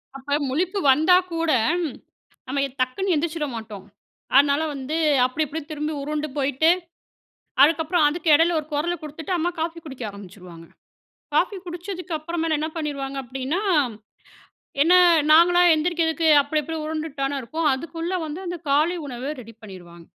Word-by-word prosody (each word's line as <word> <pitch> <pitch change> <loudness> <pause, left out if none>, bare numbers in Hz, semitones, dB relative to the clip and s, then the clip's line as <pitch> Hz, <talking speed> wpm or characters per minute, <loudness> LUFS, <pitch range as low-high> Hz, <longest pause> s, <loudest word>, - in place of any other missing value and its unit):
அப்ப 285 +2 -2
முழிப்பு 365 +9 -1
வந்தா 315 +7 +5 0.2
கூட 330 -1 0 1.0
நம்ம 275 +2 -1
எ - - -5
டக்குனு 365 +10 0
எந்திரிச்சிட 310 0 -1
மாட்டோம். 215 -4 -8 0.5
அதனால 280 +2 +5
வந்து 275 +3 -4 0.3
அப்டி 255 +5 -1
இப்டின்னு 300 +2 -7
திரும்பி 305 +1 -3
உருண்டு 300 +1 -3
போயிட்டு 280 +3 +2 0.9
அதுக்கப்புறம் 320 +2 +3
அதுக்கு 325 +2 -3
எடையில 330 +2 +3
ஒரு 300 - -14
கொரல 325 +4 0
குடுத்துட்டு 305 +3 -6
அம்மா 345 +1 0
காஃபி 335 +1 -3
குடிக்க 265 -4 -9
ஆரம்பிச்சுருவாங்க. 180 -4 -12 0.7
காஃபி 405 - +1
குடிச்சதுக்கு 355 0 -6
அப்புறமேல 325 0 -2
என்ன 310 - -1
பண்ணிருவாங்க 280 -4 -4
அப்படின்னா, 265 - -3 1.2
என்ன 335 +4 +5 0.4
நாங்களா 350 +2 +6
எந்திரிக்கிறதுக்கு 320 0 0
அப்டி 295 +2 -1
இப்டி 320 +3 -6
உருண்டுட்டு 310 -2 -5
தானே 275 +1 -1
இருப்போம். 315 +6 -2
அதுக்குள்ளே 330 +6 -4
வந்து 310 +3 -6
அந்த 350 0 -4
காலை 310 +6 +2
உணவ 265 +1 -5
ரெடி 230 -1 -13
பண்ணிருவாங்க. 175 -5 -12
305 Hz, 140 wpm, -23 LUFS, 270-330 Hz, 1.2 s, நாங்களா